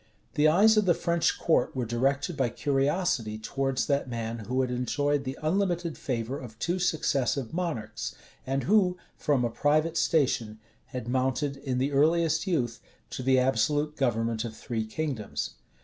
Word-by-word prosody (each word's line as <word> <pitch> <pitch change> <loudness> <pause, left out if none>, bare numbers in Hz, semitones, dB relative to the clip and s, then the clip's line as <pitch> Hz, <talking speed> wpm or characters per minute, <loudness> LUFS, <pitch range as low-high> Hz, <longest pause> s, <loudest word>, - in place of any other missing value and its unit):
The 150 +1 +4
eyes 210 +8 +5
of 210 - +4
the 175 -3 +4
French 170 -1 +1
court 165 - +1
were 125 -2 -1
directed 135 +7 0
by 130 -4 +1
curiosity 135 - 0
towards 135 +4 -1
that 140 -2 0
man 115 -1 -4
who 125 +5 -1
had 130 -1 -1
enjoyed 140 +3 0
the 130 +1 -4
unlimited 175 -1 0
favor 125 +1 -3
of 115 -3 -10
two 175 +9 -1
successive 140 -7 0
monarchs, 150 -12 -3 0.3
and 135 +1 0
who, 185 -3 +3 0.2
from 140 -5 +1
a - - 0
private 155 +5 +1
station, 125 -9 +1 0.3
had 125 -3 -6
mounted, 130 +3 0
in 130 -2 -3
the 135 +3 0
earliest 160 +3 +2
youth, 120 -10 0 0.3
to - - -4
the 130 +1 +3
absolute 140 +4 +1
government 115 -4 0
of 115 -2 -6
three 110 -2 -3
kingdoms. 130 -4 -4
135 Hz, 160 wpm, -28 LUFS, 120-160 Hz, 0.3 s, eyes